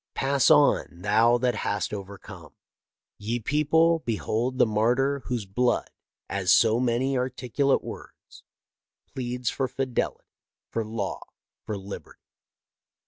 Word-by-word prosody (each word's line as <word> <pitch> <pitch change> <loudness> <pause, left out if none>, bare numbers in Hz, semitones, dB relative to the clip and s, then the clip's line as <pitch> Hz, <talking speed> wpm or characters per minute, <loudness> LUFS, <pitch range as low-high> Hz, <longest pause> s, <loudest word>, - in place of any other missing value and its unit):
Pass 135 0 +2
on, 150 -2 +5 0.2
thou 115 +4 +4
that 125 0 +1
hast 100 - -2
overcome. 100 -1 -9 0.7
Ye 115 +3 -2
people, 155 +6 +2
behold 120 0 -2
the - - +5
martyr 120 +6 +1
whose 120 -5 -3
blood, 120 +6 0 0.4
as 95 -1 0
so 110 +1 +5
many 125 +2 0
articu 130 +1 -1
late - - +3
words, - - -11 0.7
pleads 125 -2 -3
for 135 - -1
fidelity, 130 0 -3 0.5
for 115 - -1
law, 110 -2 -4 0.5
for 105 - -3
liberty." 100 +1 -9
120 Hz, 120 wpm, -26 LUFS, 110-135 Hz, 0.7 s, on